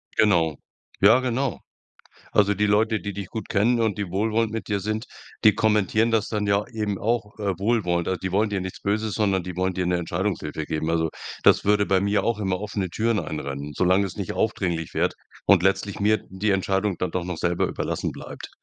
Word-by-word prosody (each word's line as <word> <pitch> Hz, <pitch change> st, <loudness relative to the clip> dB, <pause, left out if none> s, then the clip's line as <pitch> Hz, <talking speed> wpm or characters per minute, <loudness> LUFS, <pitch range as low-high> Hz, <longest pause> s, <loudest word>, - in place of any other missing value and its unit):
Genau. 85 Hz, -8 st, +3 dB, 0.4 s
Ja, 110 Hz, +6 st, +7 dB
genau. 130 Hz, -1 st, -1 dB, 0.7 s
Also 100 Hz, 0 st, +3 dB
die 105 Hz, +2 st, +1 dB
Leute, 110 Hz, +1 st, +2 dB
die 100 Hz, -, -4 dB
dich 100 Hz, 0 st, -5 dB
gut 110 Hz, -, -6 dB
kennen 115 Hz, +4 st, +2 dB
und 110 Hz, -2 st, 0 dB
die 100 Hz, -2 st, -2 dB
wohlwollend 110 Hz, +2 st, +1 dB
mit 115 Hz, 0 st, -5 dB
dir 100 Hz, -, +1 dB
sind, 110 Hz, +3 st, -3 dB, 0.4 s
die 110 Hz, -3 st, +6 dB
kommentieren 110 Hz, +1 st, +2 dB
das 110 Hz, -2 st, +1 dB
dann 105 Hz, -2 st, -1 dB
ja 100 Hz, +1 st, +2 dB
eben 105 Hz, -4 st, -3 dB
auch, 115 Hz, -1 st, -1 dB
äh, 100 Hz, -4 st, -1 dB
wohlwollend. 95 Hz, -5 st, +1 dB
Also 95 Hz, -, -1 dB
die 95 Hz, -, -3 dB
wollen 105 Hz, +3 st, +2 dB
dir 100 Hz, -2 st, -1 dB
nichts 95 Hz, 0 st, -6 dB
Böses, 105 Hz, +1 st, -1 dB
sondern 100 Hz, -4 st, +1 dB
die 90 Hz, 0 st, -7 dB
wollen 95 Hz, 0 st, 0 dB
dir 90 Hz, -1 st, -1 dB
'ne 90 Hz, -, +2 dB
Entscheidungshilfe 85 Hz, -3 st, -2 dB
geben. 80 Hz, 0 st, -2 dB
Also 80 Hz, -1 st, +1 dB, 0.3 s
das -, -, +5 dB
würde 105 Hz, 0 st, +3 dB
bei 95 Hz, -2 st, +2 dB
mir 100 Hz, +1 st, +1 dB
auch 115 Hz, -2 st, 0 dB
immer 95 Hz, -3 st, -1 dB
offene 100 Hz, -3 st, -3 dB
Türen 110 Hz, +4 st, +1 dB
einrennen, 70 Hz, -2 st, -4 dB
solang 95 Hz, +2 st, +3 dB
es 95 Hz, -, -5 dB
nicht 100 Hz, -4 st, -3 dB
aufdringlich 85 Hz, -7 st, -1 dB
wird -, -, +1 dB, 0.3 s
und 95 Hz, -4 st, +6 dB
letztlich 100 Hz, +1 st, +1 dB
mir 110 Hz, +1 st, +2 dB
die 95 Hz, +3 st, -1 dB
Entscheidung 95 Hz, 0 st, 0 dB
dann 90 Hz, -, -1 dB
doch 90 Hz, -2 st, -2 dB
noch 90 Hz, -2 st, -4 dB
selber 85 Hz, 0 st, +1 dB
überlassen -, -, -3 dB
bleibt. -, -, -9 dB
100 Hz, 205 wpm, -24 LUFS, 90-110 Hz, 0.7 s, Ja